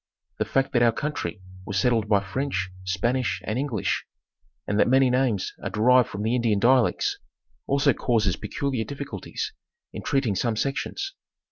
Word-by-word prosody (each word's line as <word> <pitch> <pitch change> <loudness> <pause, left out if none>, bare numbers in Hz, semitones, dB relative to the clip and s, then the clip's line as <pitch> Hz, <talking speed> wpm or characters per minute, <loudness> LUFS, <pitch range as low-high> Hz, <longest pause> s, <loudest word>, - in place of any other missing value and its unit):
The - - +1
fact 135 0 0
that 120 - +3
our 120 -1 +5
country 130 -7 -4 0.2
was 100 +1 -3
settled 110 +1 +2
by 100 -2 +4
French, 95 -3 -2
Spanish, 120 +8 0
and 110 +4 -1
English, 125 - -1 0.6
and 100 +1 0
that - - +5
many 130 0 +4
names 125 -6 +1
are - - -3
derived 125 +3 +4
from 100 +1 -5
the 110 +2 +1
Indian 115 -4 +2
dialects, 125 +3 +3 0.5
also 140 0 +3
causes 110 -7 +1
peculiar 135 -5 -2
difficulties 140 -7 -5 0.4
in - - -5
treating 135 -6 +1
some 115 +3 0
sections. 145 - -2
120 Hz, 155 wpm, -25 LUFS, 105-135 Hz, 0.6 s, our